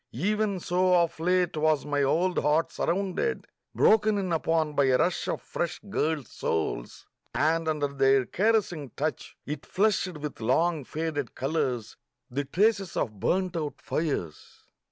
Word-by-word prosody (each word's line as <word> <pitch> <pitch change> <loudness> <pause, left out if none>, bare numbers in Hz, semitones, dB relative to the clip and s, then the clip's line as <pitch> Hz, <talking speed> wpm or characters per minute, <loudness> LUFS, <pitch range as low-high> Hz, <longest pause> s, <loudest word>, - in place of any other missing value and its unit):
Even 205 - 0
so 180 +1 +2
of 170 -2 +1
late 180 0 +1
was 155 -1 +2
my 145 -1 0
old 175 +6 +2
heart 150 +3 +2
surrounded, 195 - -1 0.3
broken 215 -1 +4
in 185 -3 -1
upon 160 -1 +1
by 140 -1 +3
a 130 -1 +4
rush 175 +5 0
of - - -3
fresh 170 -1 -3
girls' 155 -7 -1
souls... 80 -7 -3 0.3
and 160 +2 +1
under 150 -2 +1
their 135 -1 +3
caressing 190 - 0
touch 155 +3 -3
it 150 0 -5
flushed 190 -4 0
with 150 -4 -6
long 155 +7 +1
faded 155 -4 -3
colours, 130 -5 -2 0.3
the 140 +3 -2
traces 195 +4 +1
of 105 -5 -2
burnt 185 - 0
out 155 -3 -3
fires 140 - -4
160 Hz, 145 wpm, -27 LUFS, 145-185 Hz, 0.3 s, broken